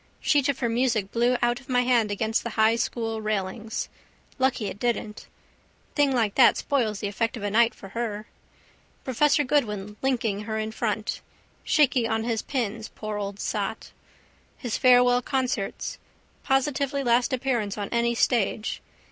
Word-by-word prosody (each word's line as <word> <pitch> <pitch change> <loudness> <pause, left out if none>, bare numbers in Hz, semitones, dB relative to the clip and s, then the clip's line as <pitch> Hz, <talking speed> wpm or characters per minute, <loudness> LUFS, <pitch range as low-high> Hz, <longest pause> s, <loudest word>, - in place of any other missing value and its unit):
Sheet 290 -2 +2
of 280 - 0
her 240 - 0
music 230 -4 0
blew 240 +2 +2
out 240 0 +2
of 265 - -19
my 250 -1 +3
hand 240 -4 +3
against 220 +3 0
the 235 - -3
High 220 +1 +5
school 225 -1 -2
railings. 215 +1 -3 0.5
Lucky 260 -4 +1
it 200 0 -5
didn't. 220 -3 -2 0.7
Thing 290 -2 +3
like 225 -6 +1
that 255 - +6
spoils 230 -8 0
the 205 - -1
effect 225 +4 -2
of 215 - -7
a 205 - -1
night 230 +2 +4
for 195 - -11
her. 215 -1 -4 0.8
Professor 295 +4 +3
Goodwin 210 -7 -1
linking 230 -6 0
her 220 0 -3
in 220 0 -2
front. 220 -1 -2 0.4
Shaky 265 -6 +3
on 220 -1 0
his 230 -1 -1
pins, 225 -4 -3
poor 215 -1 -4
old 200 0 -5
sot. - - -3 0.7
His 240 -4 -3
farewell 245 -1 +5
concerts. 255 -6 -2 0.4
Positively 275 +1 0
last 245 +2 +2
appearance 245 -6 -1
on 205 -1 -3
any 235 0 +1
stage. 225 -2 0
235 Hz, 155 wpm, -26 LUFS, 215-255 Hz, 0.8 s, that